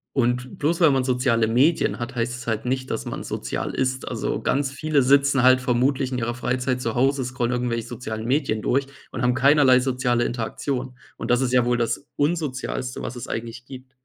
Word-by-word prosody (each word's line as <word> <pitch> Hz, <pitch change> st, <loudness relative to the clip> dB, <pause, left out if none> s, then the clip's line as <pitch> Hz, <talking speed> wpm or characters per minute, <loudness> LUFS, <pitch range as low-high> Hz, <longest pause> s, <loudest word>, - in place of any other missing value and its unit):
Und 125 Hz, -1 st, 0 dB
bloß 165 Hz, +3 st, +1 dB
weil 160 Hz, -5 st, +6 dB
man 135 Hz, -1 st, +2 dB
soziale 125 Hz, -3 st, +2 dB
Medien 130 Hz, +6 st, +2 dB
hat, 120 Hz, +2 st, -5 dB
heißt 120 Hz, +1 st, -1 dB
es 120 Hz, -, -10 dB
halt 110 Hz, -1 st, -1 dB
nicht, 130 Hz, +1 st, -2 dB
dass -, -, -2 dB
man -, -, -6 dB
sozial -, -, -3 dB
ist. 130 Hz, 0 st, -1 dB
Also, -, -, -2 dB
ganz 135 Hz, 0 st, 0 dB
viele 150 Hz, 0 st, +1 dB
sitzen 140 Hz, 0 st, +4 dB
halt 130 Hz, 0 st, +6 dB
vermutlich 130 Hz, +2 st, 0 dB
in -, -, -1 dB
ihrer 120 Hz, 0 st, -2 dB
Freizeit 125 Hz, 0 st, -1 dB
zu 115 Hz, -2 st, -3 dB
Hause, 135 Hz, +1 st, +2 dB
scrollen 125 Hz, -1 st, -2 dB
irgendwelche 120 Hz, -2 st, -1 dB
sozialen 110 Hz, -3 st, -6 dB
Medien 130 Hz, -4 st, 0 dB
durch 135 Hz, +4 st, +1 dB, 0.3 s
und -, -, -5 dB
haben 125 Hz, -, +3 dB
keinerlei 130 Hz, -1 st, +5 dB
soziale 125 Hz, -2 st, 0 dB
Interaktion. 125 Hz, +2 st, -3 dB, 0.2 s
Und -, -, -3 dB
das 125 Hz, +2 st, +3 dB
ist 125 Hz, -, 0 dB
ja 125 Hz, -1 st, +3 dB
wohl 120 Hz, 0 st, +1 dB
das 120 Hz, +4 st, -2 dB
Unsozialste, 145 Hz, -4 st, -2 dB
was 120 Hz, +1 st, -5 dB
es 120 Hz, -, -7 dB
eigentlich 115 Hz, +2 st, -5 dB
gibt. 130 Hz, -1 st, -11 dB
125 Hz, 200 wpm, -23 LUFS, 120-135 Hz, 0.3 s, weil